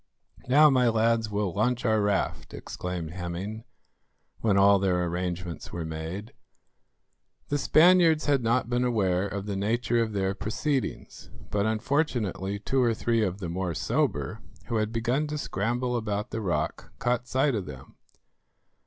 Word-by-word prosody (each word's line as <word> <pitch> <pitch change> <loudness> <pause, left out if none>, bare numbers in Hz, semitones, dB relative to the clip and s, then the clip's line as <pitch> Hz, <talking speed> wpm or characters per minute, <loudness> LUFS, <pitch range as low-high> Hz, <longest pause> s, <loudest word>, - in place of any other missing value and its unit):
"Now, 145 +4 +6
my 125 -2 +4
lads, 115 0 +2
we'll 100 -3 -1
launch 120 +5 0
our 110 -2 +3
raft," 100 -1 -1
exclaimed 90 -3 -5
Hemming, 95 +5 -5 0.7
when 105 -3 +2
all 100 0 +6
their 90 -2 +1
arrangements 85 -1 -4
were 85 -2 -4
made. 80 +7 -6 1.2
The 145 - 0
Spaniards 165 0 +5
had 140 -3 +2
not 115 +1 +1
been 120 +1 0
aware 100 -6 +1
of 100 0 -5
the 100 -1 -3
nature 115 +4 +1
of 110 -2 -2
their 95 -1 0
proceedings, 130 +6 -3 0.2
but 105 +1 +1
unfortunately 110 - -1
two 130 +6 0
or 120 -2 +2
three 115 +1 +1
of 95 -2 -1
the 95 -4 -5
more 90 0 -3
sober, - - -1 0.3
who 115 - 0
had 110 0 0
begun 120 +6 0
to 150 0 -3
scramble 120 +1 -1
about 105 -1 -2
the 110 - -3
rock, 95 -4 -2
caught 125 0 -1
sight 135 +3 +2
of 105 -5 -3
them. 70 -2 -10
110 Hz, 155 wpm, -27 LUFS, 95-125 Hz, 1.2 s, Now